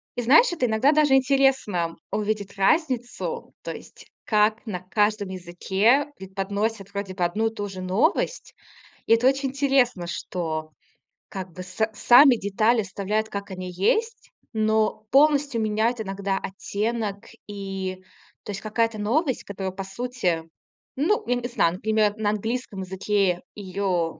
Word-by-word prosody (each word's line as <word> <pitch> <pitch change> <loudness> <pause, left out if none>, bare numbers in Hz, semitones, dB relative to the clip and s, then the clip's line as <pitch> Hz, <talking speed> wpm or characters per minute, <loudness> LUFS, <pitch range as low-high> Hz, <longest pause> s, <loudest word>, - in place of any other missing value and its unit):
И 245 - -1
знаешь, 305 - +6
это 320 -7 0
иногда 230 +6 +3
даже 300 -3 +4
интересно 265 -11 +2 0.2
увидеть 210 -2 -2
разницу, 245 - 0
то - - -4
есть - - -12 0.2
как 215 +2 +2
на 190 -5 -4
каждом 205 +1 0
языке 190 - +1
преподносят 200 +2 -3
вроде 200 -1 -4
бы 180 -2 -2
одну 210 +6 +1
и 225 - -4
ту 205 -1 -3
же 185 -1 -7
новость. 230 - 0 0.5
И 225 - +6
это 235 +3 +4
очень 270 0 +1
интересно, 265 -9 +1
что 160 -3 -4 0.6
как 185 -2 -6
бы 185 - -7
с 180 - -13 0.2
сами 245 +5 +7
детали 220 +3 +2
оставляют, 210 +3 -2
как 200 -1 -6
они 185 -1 -6
есть, 445 - 0 0.2
но 215 0 +1
полностью 280 -4 +4
меняют 220 +2 0
иногда 195 -1 -2
оттенок 205 +2 -3 0.2
и, 195 -2 -5 0.5
то - - -12
есть 195 - -5
какая-то 225 0 0
новость, 260 +6 0
которая 190 -1 -4
по 195 +1 -6
сути 195 -6 -2 0.5
ну, 340 +10 +1
я 245 - +2
не 245 0 -3
знаю, 175 -8 +1
например, 215 +1 +1
на 210 -1 +1
английском 215 -1 -3
языке 190 -1 0
её 185 -4 -2
210 Hz, 145 wpm, -24 LUFS, 190-245 Hz, 0.6 s, сами